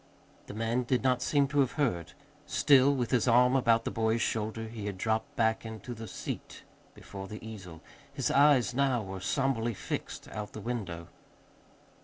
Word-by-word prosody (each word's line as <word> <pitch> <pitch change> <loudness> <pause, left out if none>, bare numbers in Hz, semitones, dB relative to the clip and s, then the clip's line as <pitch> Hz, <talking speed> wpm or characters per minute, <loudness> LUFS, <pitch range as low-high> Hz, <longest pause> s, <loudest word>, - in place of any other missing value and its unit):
The - - -8
man 115 +3 0
did 125 0 0
not 125 -1 +2
seem 140 0 +2
to 145 - 0
have 135 -3 +2
heard. 90 - -1 0.3
Still 140 -1 +5
with 125 -3 -2
his 125 -1 +2
arm 125 +2 +5
about 115 -3 +3
the - - -1
boy's 110 0 +1
shoulder, 110 0 -2
he 110 -2 -6
had 100 -2 -4
dropped 110 +2 -1
back 110 0 +1
into 110 +2 -7
the 110 -1 -8
seat - - -7 0.3
before 95 -1 -9
the 105 +2 -8
easel. 90 -7 -9 0.3
His 135 -2 -1
eyes 140 -6 +4
now 130 -3 +1
were 95 -1 -6
somberly 120 +1 0
fixed - - -5
out 105 -1 -6
the - - -7
window. 95 -8 -5
115 Hz, 175 wpm, -30 LUFS, 105-130 Hz, 0.3 s, Still